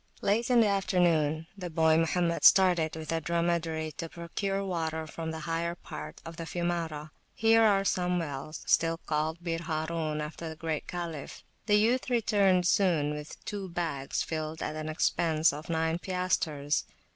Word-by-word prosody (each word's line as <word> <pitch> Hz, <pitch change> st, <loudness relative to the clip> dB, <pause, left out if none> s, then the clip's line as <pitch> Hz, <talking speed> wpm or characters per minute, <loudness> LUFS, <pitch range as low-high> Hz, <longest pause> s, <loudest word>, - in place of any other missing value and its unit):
Late 225 Hz, +5 st, +1 dB
in 245 Hz, -2 st, +6 dB
the 220 Hz, -, +4 dB
afternoon 170 Hz, -6 st, +2 dB
the 180 Hz, -3 st, -6 dB
boy 160 Hz, -1 st, +3 dB
Mohammed 170 Hz, +1 st, +1 dB
started 175 Hz, -5 st, +5 dB
with 160 Hz, -1 st, -6 dB
a 165 Hz, 0 st, 0 dB
dromedary 170 Hz, -1 st, -1 dB
to 165 Hz, -, -4 dB
procure 195 Hz, +4 st, -3 dB
water 160 Hz, -3 st, -2 dB
from 160 Hz, +1 st, -6 dB
the 160 Hz, 0 st, -5 dB
higher 170 Hz, +1 st, -2 dB
part 75 Hz, -, -9 dB
of 165 Hz, 0 st, -8 dB
the 165 Hz, -, -5 dB
Fiumara. 165 Hz, -4 st, -3 dB, 0.2 s
Here 225 Hz, 0 st, +5 dB
are 200 Hz, -3 st, +4 dB
some 180 Hz, -1 st, +1 dB
wells, 150 Hz, -2 st, -5 dB
still 165 Hz, 0 st, +2 dB
called 160 Hz, +1 st, -2 dB
Bir 165 Hz, -1 st, -1 dB
Harun, 155 Hz, -1 st, -2 dB
after 155 Hz, +2 st, -5 dB
the 160 Hz, -, -7 dB
great 160 Hz, -1 st, -3 dB
Caliph. 170 Hz, -5 st, -6 dB, 0.2 s
The 210 Hz, -, +5 dB
youth 240 Hz, +5 st, +2 dB
returned 205 Hz, -6 st, +3 dB
soon 170 Hz, -6 st, +2 dB
with 150 Hz, 0 st, -8 dB
two 200 Hz, -3 st, -4 dB
bags 165 Hz, -6 st, -2 dB
filled 155 Hz, 0 st, -4 dB
at 155 Hz, -, -3 dB
an 155 Hz, 0 st, -4 dB
expense 160 Hz, 0 st, +2 dB
of 150 Hz, +3 st, -8 dB
nine 160 Hz, 0 st, 0 dB
piastres. 170 Hz, -6 st, 0 dB
165 Hz, 165 wpm, -29 LUFS, 155-180 Hz, 0.2 s, in